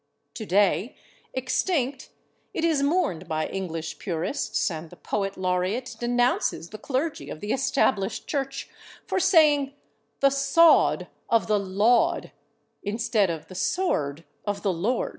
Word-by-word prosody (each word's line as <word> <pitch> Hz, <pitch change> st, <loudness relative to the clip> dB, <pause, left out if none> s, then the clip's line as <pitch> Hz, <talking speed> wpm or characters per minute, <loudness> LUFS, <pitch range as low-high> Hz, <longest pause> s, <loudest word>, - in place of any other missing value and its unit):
Today, 205 Hz, -, +1 dB, 0.4 s
extinct, 260 Hz, 0 st, -1 dB, 0.5 s
it 330 Hz, -, 0 dB
is 315 Hz, -4 st, +2 dB
mourned 280 Hz, -, 0 dB
by 155 Hz, -1 st, -1 dB
English 165 Hz, -4 st, -5 dB
purists, 180 Hz, -, -1 dB
and 160 Hz, 0 st, -6 dB
the 180 Hz, -, -13 dB
Poet 195 Hz, +1 st, -3 dB
Laureate 185 Hz, +7 st, -1 dB
denounces 245 Hz, -8 st, 0 dB
the 215 Hz, -, -8 dB
clergy 285 Hz, +6 st, -2 dB
of -, -, -7 dB
the 205 Hz, +4 st, -2 dB
Established 265 Hz, -6 st, +1 dB
Church 275 Hz, -2 st, -3 dB, 0.4 s
for -, -, 0 dB
saying 295 Hz, -7 st, +4 dB, 0.4 s
"the 275 Hz, -, +5 dB
/sawed/ 275 Hz, +5 st, +4 dB, 0.2 s
of 230 Hz, -1 st, +3 dB
the 210 Hz, -1 st, +2 dB
/Laud/" 205 Hz, +5 st, +2 dB, 0.5 s
instead 220 Hz, -1 st, +1 dB
of 165 Hz, -2 st, -4 dB
"the -, -, -11 dB
sword 165 Hz, -, -1 dB, 0.2 s
of 205 Hz, -1 st, -3 dB
the 195 Hz, -3 st, +1 dB
Lord." 215 Hz, +9 st, 0 dB
225 Hz, 130 wpm, -26 LUFS, 185-275 Hz, 0.5 s, the